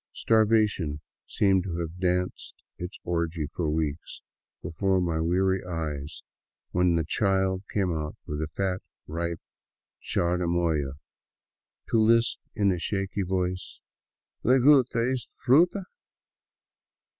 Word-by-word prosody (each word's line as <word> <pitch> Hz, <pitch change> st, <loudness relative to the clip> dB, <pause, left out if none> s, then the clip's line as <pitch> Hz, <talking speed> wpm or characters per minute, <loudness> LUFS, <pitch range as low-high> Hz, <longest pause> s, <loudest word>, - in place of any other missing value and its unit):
Starvation 105 Hz, -9 st, +2 dB, 0.3 s
seemed 95 Hz, -2 st, +2 dB
to 85 Hz, -4 st, -4 dB
have 85 Hz, +1 st, -5 dB
danced 90 Hz, 0 st, -1 dB, 0.2 s
its 90 Hz, +2 st, -6 dB
orgy 85 Hz, -2 st, -1 dB
for 80 Hz, +2 st, -3 dB
weeks 75 Hz, 0 st, -3 dB, 0.4 s
before 95 Hz, +4 st, +1 dB
my 85 Hz, -3 st, 0 dB
weary 95 Hz, +3 st, +1 dB
eyes 80 Hz, -4 st, -5 dB, 0.5 s
when 90 Hz, -1 st, +3 dB
the 80 Hz, -, +1 dB
child 95 Hz, -2 st, +1 dB
came 95 Hz, -5 st, 0 dB
out 75 Hz, -1 st, -4 dB
with 75 Hz, 0 st, -4 dB
a 80 Hz, -, -1 dB
fat, 95 Hz, +3 st, -2 dB, 0.2 s
ripe 85 Hz, +1 st, -3 dB, 0.6 s
chirimoya, 85 Hz, -5 st, 0 dB, 0.9 s
to 115 Hz, -, +2 dB
lisp 115 Hz, +1 st, +3 dB, 0.2 s
in 100 Hz, -2 st, +3 dB
a 90 Hz, -, -1 dB
shaky 100 Hz, +2 st, -2 dB
voice, 90 Hz, 0 st, -2 dB, 0.3 s
" -, -, -54 dB
Le 130 Hz, +3 st, +5 dB
gu'ta 130 Hz, -3 st, +5 dB
e'ta 130 Hz, -3 st, -2 dB
f -, -, -24 dB
ruta 175 Hz, +9 st, +4 dB
90 Hz, 120 wpm, -27 LUFS, 80-100 Hz, 0.9 s, Le